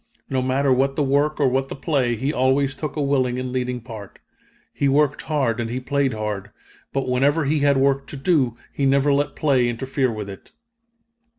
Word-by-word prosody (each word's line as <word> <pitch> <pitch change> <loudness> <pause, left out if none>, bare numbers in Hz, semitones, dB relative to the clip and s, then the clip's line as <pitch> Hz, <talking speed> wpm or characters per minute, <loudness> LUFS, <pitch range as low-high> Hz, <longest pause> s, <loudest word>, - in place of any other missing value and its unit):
No 130 -1 +1
matter 130 +1 +2
what 135 +2 +1
the 150 - +1
work 145 +3 +1
or 140 - +4
what 135 +1 0
the - - -5
play, 135 -5 0
he 135 +6 -2
always 135 +1 +2
took 150 0 -5
a 150 - -1
willing 130 -3 +1
and 130 0 -3
leading 125 -1 -2
part. 110 -4 -10 0.6
He 140 - +1
worked 145 +1 +2
hard 135 -8 0
and 115 -1 -2
he 125 +2 -2
played 135 -1 0
hard; 105 -2 -4 0.4
but 135 -1 -2
whenever 140 +5 +2
he 150 +2 +1
had 140 -1 +3
work 135 0 +2
to 145 - -8
do, 135 -6 +1 0.2
he 140 - +1
never 140 +1 +3
let 145 +1 0
play 130 -5 +2
interfere 130 +2 -1
with 105 -2 -5
it." 100 -1 -11
135 Hz, 200 wpm, -22 LUFS, 125-140 Hz, 0.6 s, or